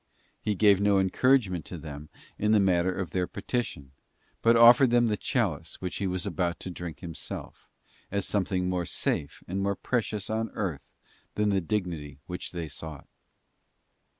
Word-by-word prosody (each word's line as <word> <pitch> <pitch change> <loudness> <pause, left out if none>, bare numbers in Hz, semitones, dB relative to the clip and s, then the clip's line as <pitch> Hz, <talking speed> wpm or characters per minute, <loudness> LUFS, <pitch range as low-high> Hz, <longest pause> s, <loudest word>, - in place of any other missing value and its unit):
He 105 - 0
gave 100 -1 +5
no 100 -1 +4
encouragement 95 - +3
to 90 - -7
them 75 -1 -8 0.3
in 105 +1 +3
the 110 - +6
matter 95 -2 +3
of 90 -3 -4
their 90 0 0
petition, 100 - -3 0.5
but 115 +1 +5
offered 120 +3 +8
them 120 0 +4
the 110 -2 +1
chalice - - -1
which 90 -1 -4
He 100 - -1
was 90 +1 -2
about 85 -2 -1
to 95 - -5
drink 85 -2 -7
Himself, 85 -3 -7 0.4
as 100 -1 -1
something 95 -2 0
more 90 -2 -1
safe 70 - -2
and 95 +2 -2
more 100 0 0
precious 110 -3 -2
on 110 +1 -1
earth 75 -8 -3 0.5
than 105 0 +2
the 100 -1 +2
dignity 85 -7 -3
which 90 0 -5
they 85 -3 -4
sought. 80 -1 -7
95 Hz, 165 wpm, -28 LUFS, 85-105 Hz, 0.5 s, offered